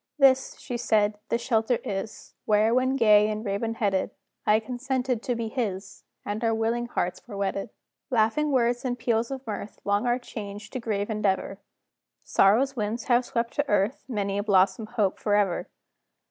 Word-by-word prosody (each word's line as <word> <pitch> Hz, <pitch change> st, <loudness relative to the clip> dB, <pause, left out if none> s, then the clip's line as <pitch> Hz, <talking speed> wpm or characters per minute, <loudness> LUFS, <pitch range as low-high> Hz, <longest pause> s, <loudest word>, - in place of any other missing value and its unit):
"This," 270 Hz, -2 st, +4 dB
she 245 Hz, -2 st, -4 dB
said, 210 Hz, -3 st, +1 dB
"the -, -, +2 dB
shelter 235 Hz, 0 st, +1 dB
is, 195 Hz, +2 st, -5 dB
Where, 215 Hz, +2 st, +3 dB
when 260 Hz, +2 st, +2 dB
gay 210 Hz, -4 st, +5 dB
and 215 Hz, +1 st, -4 dB
raven 215 Hz, +3 st, -2 dB
headed, 195 Hz, -4 st, 0 dB, 0.4 s
I 210 Hz, +1 st, +5 dB
consented 250 Hz, +1 st, -2 dB
to 245 Hz, -1 st, -1 dB
be 230 Hz, -1 st, -3 dB
his, 205 Hz, -5 st, -4 dB, 0.2 s
And 210 Hz, +3 st, -3 dB
our 225 Hz, -1 st, +2 dB
willing 230 Hz, +2 st, 0 dB
hearts 180 Hz, -6 st, -2 dB
were 205 Hz, -4 st, -7 dB
wedded. 195 Hz, 0 st, -2 dB, 0.4 s
"Laughing 250 Hz, +5 st, +2 dB
words 245 Hz, -2 st, +2 dB
and 245 Hz, -2 st, -2 dB
peals 230 Hz, -1 st, 0 dB
of 270 Hz, -1 st, -6 dB
mirth, 210 Hz, -1 st, -6 dB
Long 205 Hz, +4 st, +1 dB
are 240 Hz, 0 st, +2 dB
changed 210 Hz, -4 st, -8 dB
to 255 Hz, -, -2 dB
grave 210 Hz, -2 st, -2 dB
endeavor; 195 Hz, -2 st, -1 dB, 0.6 s
Sorrow's 250 Hz, +8 st, +3 dB
winds 220 Hz, +1 st, -2 dB
have 245 Hz, 0 st, +2 dB
swept 235 Hz, -2 st, -2 dB
to 290 Hz, 0 st, 0 dB
earth 205 Hz, +5 st, +1 dB
Many 200 Hz, -5 st, -1 dB
a -, -, -1 dB
blossomed 200 Hz, +2 st, +2 dB
hope 200 Hz, -3 st, +1 dB
forever. 205 Hz, -4 st, +1 dB
225 Hz, 170 wpm, -26 LUFS, 205-245 Hz, 0.6 s, gay